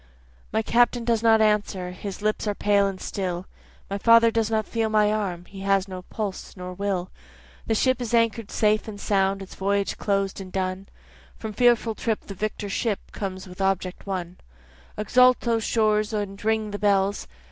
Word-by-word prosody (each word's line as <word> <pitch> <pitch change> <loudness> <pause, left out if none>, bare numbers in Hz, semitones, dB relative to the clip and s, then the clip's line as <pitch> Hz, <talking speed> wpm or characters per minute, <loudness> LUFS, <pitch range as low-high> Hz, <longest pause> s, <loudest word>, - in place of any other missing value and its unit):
My 220 - +1
Captain 240 +1 +2
does 230 -2 +2
not 225 -1 +5
answer, 205 -4 +1
his 195 +2 -7
lips 215 0 0
are 205 - 0
pale 200 -1 +3
and 195 -1 -5
still, 185 -2 -3 0.4
My 200 +1 -3
father 230 +1 +6
does 225 -1 0
not 220 -1 0
feel 225 -1 -1
my 210 -1 +3
arm, 185 -5 -3
he 195 +2 -11
has 195 0 +1
no 185 -1 -7
pulse 200 +1 -6
nor 180 0 -6
will, 190 -1 -2 0.6
The 225 - +1
ship 255 +2 +2
is 235 - -3
anchor'd 230 -2 +1
safe 215 0 +1
and 205 -2 -7
sound, 195 -1 +1
its 190 - -12
voyage 200 +1 -1
closed 195 -1 -1
and 185 -1 -9
done, 185 +1 -3 0.5
From 220 -1 -6
fearful 240 0 +3
trip 220 0 -2
the 200 - -9
victor 210 +1 -3
ship 205 +1 -2
comes 190 -2 -5
in 185 - -12
with 180 - -8
object 190 0 -1
won; 180 -2 -4 0.6
Exult 250 +4 +4
O 230 -1 +3
shores, 215 -1 +1
and 205 -1 -3
ring 220 -1 0
O 205 - -3
bells! 200 -1 +1
205 Hz, 185 wpm, -25 LUFS, 195-220 Hz, 0.6 s, father